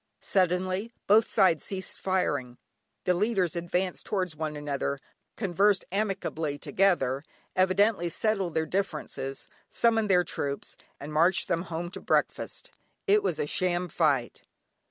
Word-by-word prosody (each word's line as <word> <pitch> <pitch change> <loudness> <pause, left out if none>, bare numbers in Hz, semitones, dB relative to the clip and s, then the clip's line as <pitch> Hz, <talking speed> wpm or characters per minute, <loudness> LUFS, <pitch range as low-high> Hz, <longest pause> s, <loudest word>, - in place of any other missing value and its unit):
Suddenly, 185 +3 +1
both 220 +2 +5
sides 185 -7 +3
ceased 190 -1 -4
firing, 145 -10 -1 0.5
the 180 - +3
leaders 190 -2 +1
advanced 175 +2 -1
towards 185 -5 -2
one 155 0 -3
another, 140 -1 -2 0.4
conversed 195 0 +2
amicably 190 -7 -1
together, 145 -8 +1 0.3
evidently 185 0 +3
settled 195 -1 -1
their 160 - +2
differences, 155 -7 -3 0.2
summoned 225 -2 +2
their 180 -2 +5
troops, 140 -4 -4 0.2
and 150 +2 -7
marched 170 +5 +3
them 170 - +1
home 170 +1 -4
to - - -7
breakfast. - - -1 0.3
It 415 +1 +4
was 405 - -1
a 455 - 0
sham 180 - 0
fight. 145 -7 +1
180 Hz, 130 wpm, -28 LUFS, 160-195 Hz, 0.5 s, both